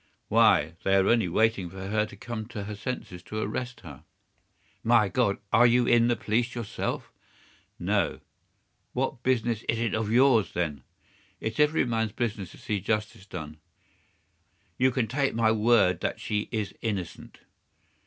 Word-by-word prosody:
"Why, 80 +3 +4
they 95 - +2
are 95 0 +4
only 115 -5 +3
waiting 105 -1 +1
for 95 +1 -7
her 105 0 +1
to 100 - -12
come 110 +1 -6
to 110 -4 -6
her 105 +1 -6
senses 100 -5 -5
to 110 - -7
arrest 120 +4 -4
her." 75 -4 -11 0.8
"My 115 -3 +4
God! 100 0 +1 0.2
Are 120 +1 +7
you 120 +1 +3
in 120 -1 +4
the 120 - +2
police 120 +2 -1
yourself?" 115 -3 -4 0.7
"No." - - 0 0.7
"What 130 -1 -2
business 120 -3 0
is 115 - +2
it 115 0 -1
of 110 -1 -1
yours, 120 -3 +4
then?" 75 -6 -2 0.6
"It's 110 0 -4
every 150 0 +3
man's 115 -3 -1
business 110 -6 -3
to - - -14
see 105 -2 -2
justice 105 0 -2
done." 80 -5 -7 1.2
"You 130 +1 +5
can 125 -2 0
take 140 +3 0
my 115 -1 +3
word 105 -5 +3
that - - -2
she 105 0 -2
is 105 -4 -2
innocent." 100 -6 -5
110 Hz, 160 wpm, -27 LUFS, 100-120 Hz, 1.2 s, Are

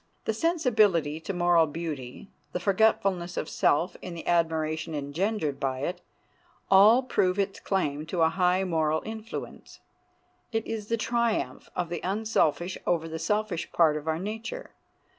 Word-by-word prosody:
The 220 - 0
sensibility 215 - +2
to 160 - -5
moral 175 -3 +3
beauty, 150 0 -6 0.2
the - - -1
forgetfulness 195 -2 +1
of - - -2
self 165 +5 +1
in 175 - -7
the 165 - -8
admiration 160 -1 0
engendered 150 +2 -2
by 130 -1 -2
it, 175 +4 -3 0.7
all 215 +7 +7
prove 185 -7 +1
its 200 -1 -1
claim 155 -6 -1
to 170 -1 +1
a 160 - +5
high 180 +2 +2
moral 160 -3 0
influence. 220 0 -7 0.7
It 225 -1 -1
is 220 -2 -4
the 230 - 0
triumph 230 - -1
of 175 -2 -2
the 170 -1 -4
unselfish 190 -4 0
over 165 -2 +1
the 160 0 -5
selfish 210 0 -1
part 160 -3 +4
of 150 +1 -5
our 160 0 +1
nature. 220 - -6
175 Hz, 150 wpm, -27 LUFS, 160-215 Hz, 0.7 s, all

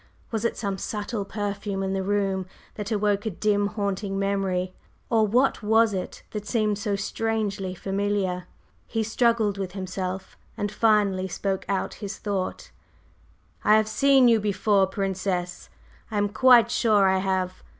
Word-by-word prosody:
Was 220 -2 -2
it 235 - 0
some 200 -3 -3
subtle 210 0 -3
perfume 200 -1 -3
in 190 0 -1
the 195 - -1
room 195 -1 0 0.3
that 210 -1 -5
awoke 205 0 +1
a - - +2
dim 205 +1 +1
haunting 200 -1 -2
memory? 195 -2 -1 0.4
Or 220 -2 +4
what 250 +6 +2
was 220 0 +3
it 185 -1 -5
that 210 -1 -5
seemed 215 -3 0
so 205 -1 -1
strangely 200 -2 -2
familiar? 195 -1 -1 0.4
He 225 -1 -1
struggled 220 -2 +1
with 185 -2 -4
himself, 185 0 -5 0.2
and 205 0 -2
finally 205 -4 +2
spoke 190 +1 -2
out 195 -1 -1
his 200 0 -5
thought: 195 -3 -3 0.9
"I 210 - +6
have 215 0 +3
seen 270 +3 +5
you 230 -2 +5
before, 205 -1 +2
Princess; 190 -2 -3 0.4
I 215 - -3
am 205 0 +1
quite 235 +3 +6
sure 210 -5 +4
I 190 0 +3
have! 185 -1 -1
200 Hz, 150 wpm, -25 LUFS, 190-215 Hz, 0.9 s, I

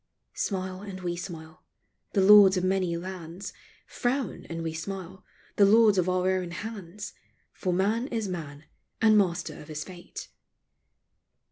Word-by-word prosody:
Smile 185 -1 -3
and 195 -2 -7
we 175 -1 -2
smile, 165 -3 -8 0.5
the 195 - +3
lords 200 -1 +8
of 180 - 0
many 185 -2 +1
lands; 180 +1 -7 0.3
Frown 255 +2 -2
and 165 0 -4
we 160 -1 -3
smile, 190 +2 -6 0.3
the 200 - +7
lords 210 -1 +6
of 180 0 +1
our 185 +1 +2
own 185 -2 -1
hands; 205 0 -7 0.4
For 185 - -2
man 210 +7 +1
is 225 -6 -2
man 155 -5 -6 0.3
and 220 -1 +5
master 180 -4 +1
of 150 - -12
his 155 0 -5
fate. 180 0 -10
185 Hz, 145 wpm, -28 LUFS, 175-200 Hz, 0.5 s, lords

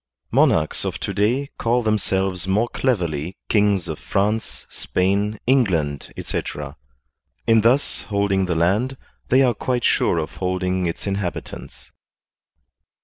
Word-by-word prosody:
Monarchs 80 -1 +3
of - - -2
to 100 - -4
day 120 +8 +1
call 120 +1 +1
them 110 -1 +2
selves 95 -1 -1
more 105 +5 +2
cleverly 90 - -1
kings 100 -4 +2
of 80 -2 -5
France, 100 - -1
Spain, 100 +3 -1
England, 90 - +1
etc.; - - -4 0.7
in 115 -1 +5
thus 125 +6 +2
holding 100 -2 +1
the 85 - 0
land 105 +11 +1 0.3
they 130 +2 +5
are 125 -2 +3
quite 125 +1 -2
sure - - +2
of 80 -1 -3
holding 90 -1 -1
its 85 - -4
inhabitants. 100 -3 -5
100 Hz, 130 wpm, -22 LUFS, 90-115 Hz, 0.7 s, in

